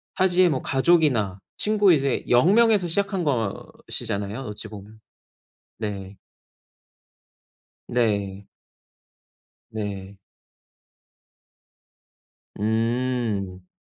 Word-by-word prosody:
타지에 185 -1 +4
뭐 135 -4 -1
가족이나 135 - +2 0.2
친구 210 -3 +3
이제 140 -3 0
0 125 +11 +5
명에서 220 -5 +4
시작한 195 +1 0
것이잖아요 110 -3 -3
어찌보면. 105 -2 -9 0.8
네. 100 -3 -5 1.7
네. 100 -4 -1 1.2
네. 100 -2 -6 2.4
음. 110 -4 -1
115 Hz, 135 characters per minute, -24 LUFS, 100-165 Hz, 2.4 s, 0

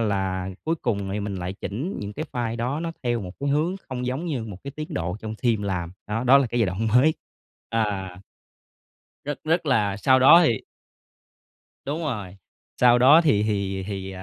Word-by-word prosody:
là 95 -3 -1 0.2
cuối 165 +1 +1
cùng 100 -5 -1
thì 105 - -2
mình 100 -1 -4
lại 90 0 -4
chỉnh 120 - -5
những 105 0 -5
cái - - -4
file 120 -2 -2
đó 125 +6 -2
nó 165 -1 -3
theo 120 -1 0
một 90 -3 -6
cái 140 - -1
hướng 155 +6 +1
không 125 -1 -4
giống 135 +7 -3
như 135 -9 -2
một 105 -4 -8
cái 140 - -5
tiến 155 +3 -7
độ 90 0 -2
trong 110 0 -5
team 115 -4 +1
làm, 90 -4 -3
đó, 115 +4 -2
đó 135 +3 +7
là 135 - +1
cái 120 +1 -1
giai 110 - +3
đoạn 100 +5 -1
mới. 150 +5 +5 0.6
à. 100 -5 -2 1.0
Rất, 145 0 -4
rất 165 0 +1
là 105 -7 +2
sau 130 +5 +4
đó 165 +7 +9
thì 115 -6 +1 1.3
Đúng 150 +4 -2
rồi, 100 -9 -4 0.4
sau 120 -1 +6
đó 140 +6 +7
thì 145 -11 +3
thì 100 -2 -1
thì, 95 -2 -5
ờ, 95 0 -8
115 Hz, 205 wpm, -24 LUFS, 100-140 Hz, 1.3 s, đó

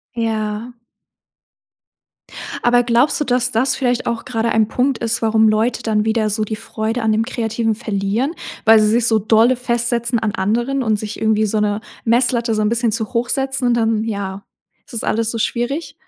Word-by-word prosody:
Ja. 225 +1 -3 1.9
Aber 245 0 +4
glaubst 240 +5 +2
du, 295 - -1
dass 250 -1 +1
das 255 +4 +1
vielleicht 245 -2 -1
auch 235 -1 -2
grade 230 -2 -1
ein 220 -1 +2
Punkt 255 +3 0
ist, 230 0 -1
warum 220 0 +3
Leute 220 +3 0
dann 215 -1 0
wieder 220 -1 +1
so 215 +1 -1
die 215 +1 -3
Freude 225 +2 -3
an 220 - +1
dem 220 +1 +2
Kreativen 225 -3 -1
verlieren? 215 +5 -1 0.3
Weil 225 0 +7
sie 215 - +3
sich 235 +2 +2
so 220 -1 +3
dolle 225 +4 +3
festsetzen 240 -1 -1
an 215 -2 -1
anderen 240 +7 0
und 220 -2 +1
sich 210 0 -6
irgendwie 220 0 +2
so 215 +1 0
'ne 210 0 0 0.2
Messlatte 235 0 +2
so 215 - 0
'n 210 - +2
bisschen 235 -1 +1
zu 220 +2 -3
hoch 235 +1 0
setzen 270 -1 0
und 240 - +3
dann, 225 -2 +1
ja, 200 -3 -4 0.4
ist - - -17
das 230 - -3
alles 225 0 0
so 230 - -4
schwierig? 245 +8 -2
225 Hz, 190 wpm, -18 LUFS, 215-240 Hz, 1.9 s, Weil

